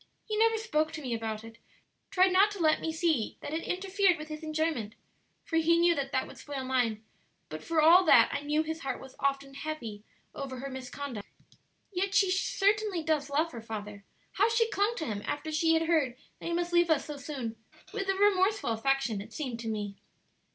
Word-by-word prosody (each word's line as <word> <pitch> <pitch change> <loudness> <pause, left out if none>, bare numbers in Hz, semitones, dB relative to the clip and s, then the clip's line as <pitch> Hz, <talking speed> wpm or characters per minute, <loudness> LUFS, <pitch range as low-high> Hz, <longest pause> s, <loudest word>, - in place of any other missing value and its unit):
He 430 - -3
never 450 +1 +3
spoke 315 -9 0
to 310 - -5
me 250 -3 -2
about 220 -1 -3
it, 225 0 -12 0.5
tried 370 -1 +4
not 395 +3 +6
to 410 -2 -8
let 310 -2 +3
me 325 - -1
see 320 -8 0
that 290 - -6
it 320 - -1
interfered 380 0 +1
with 305 0 -8
his 305 0 -6
enjoyment 310 -8 -2 0.5
(for 325 -5 -1
he 330 +1 +4
knew 340 0 +5
that 275 -3 -3
that 260 - 0
would - - -12
spoil 280 -2 -5
mine), 245 -4 0 0.5
but - - -7
for 330 -1 0
all 345 +4 +8
that - - +7
I 285 - -2
knew 300 +2 +1
his 320 +1 -4
heart 270 -4 -3
was 265 0 -12
often 275 0 -1
heavy 265 -8 -6 0.3
over 270 -2 -6
her 275 +2 -6
misconduct. 260 -3 -6 0.7
"Yet 385 +2 -1
she 385 -2 +4
certainly 395 -1 +1
does 300 -2 0
love 310 +4 +1
her 235 - -7
father. 210 -2 -7 0.3
How 420 +4 +3
she 455 0 +2
clung 410 +4 +1
to 315 - -3
him 210 -6 -3
after 310 +2 -3
she 325 +1 +3
had 325 - +2
heard 315 -7 +1 0.2
that - - -6
he 340 - -1
must 345 0 -1
leave 345 0 +4
us 315 -3 +2
so 295 -1 -6
soon, 265 -6 -5 0.4
with 390 -3 -3
a 390 - +2
remorseful 400 - +3
affection, 230 -2 0
it 205 - -11
seemed 255 -7 -4
to 230 - -6
me." 205 -2 -4
310 Hz, 210 wpm, -30 LUFS, 260-360 Hz, 0.7 s, all